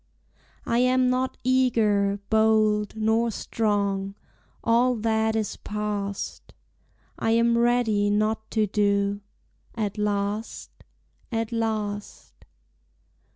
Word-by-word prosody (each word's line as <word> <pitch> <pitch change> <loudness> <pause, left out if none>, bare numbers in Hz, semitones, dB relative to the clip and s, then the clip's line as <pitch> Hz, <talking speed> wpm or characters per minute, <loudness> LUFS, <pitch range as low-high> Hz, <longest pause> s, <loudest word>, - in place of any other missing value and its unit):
I 235 - +1
am 255 0 +3
not 255 +1 -1
eager, 220 -6 +2
bold, 215 -1 +2
Nor 220 +2 +1
strong, 200 -3 -1 0.5
all 240 +2 +3
that 220 0 0
is 215 -2 -2
past; 205 -1 -5 0.6
I - - 0
am 235 0 +3
ready 235 -4 +2
not 215 +1 0
to 220 -2 +1
do, 200 0 0 0.5
At 210 -2 -3
last, 205 +1 -2 0.6
at 225 -1 -2
last. 215 -3 -3
220 Hz, 95 wpm, -25 LUFS, 205-230 Hz, 0.6 s, am